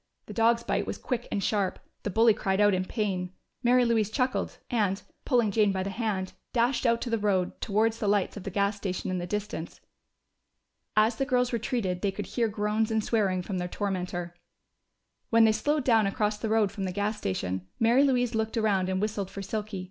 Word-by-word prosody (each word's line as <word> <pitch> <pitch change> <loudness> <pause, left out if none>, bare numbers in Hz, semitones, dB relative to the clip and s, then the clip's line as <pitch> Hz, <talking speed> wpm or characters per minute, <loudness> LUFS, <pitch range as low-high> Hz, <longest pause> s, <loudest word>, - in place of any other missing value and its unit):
The - - -8
dog's 230 +1 +3
bite - - -1
was - - -3
quick 245 -2 -3
and 200 - -1
sharp: 200 -3 0 0.2
the - - -3
bully 225 +3 +5
cried 195 -2 -1
out 205 -1 +5
in 185 0 0
pain. 185 -4 -2 0.3
Mary 250 0 +4
Louise 225 -3 +2
chuckled 255 +3 -1
and, 205 -5 +1 0.3
pulling 240 -6 +3
Jane 210 -1 +3
by 190 -1 -1
the 195 - -3
hand, 195 -3 -2 0.2
dashed 245 +2 +2
out 230 0 +2
to 240 - -3
the 230 - +1
road, 195 -3 0
towards 220 +2 +1
the 210 - -1
lights 205 -1 +1
of 205 - -6
the 195 - -5
gas 200 +2 +1
station 190 -2 -3
in 185 - -1
the 175 - -4
distance. 205 -4 -4 1.2
As 220 +2 +4
the 270 - 0
girls 250 -2 +1
retreated, 225 -6 -1
they 200 - +1
could 195 - -5
hear 235 -2 0
groans 210 +1 0
and 220 -1 +1
swearing 195 -6 +1
from 185 0 -3
their 180 - -2
tormentor. 180 -3 -3 0.9
When 230 0 +5
they 220 - +6
slowed 290 +6 0
down 225 -5 +4
across 210 +1 -1
the 220 - -2
road 215 -3 +3
from 195 -3 -4
the 185 - -2
gas 205 +3 -2
station, 95 -1 -3
Mary 235 +4 +5
Louise 245 -3 +2
looked 220 +1 -1
around 200 -4 +2
and 190 0 0
whistled 205 -2 -2
for 200 - -7
Silky. 210 0 -4
210 Hz, 210 wpm, -28 LUFS, 190-230 Hz, 1.2 s, they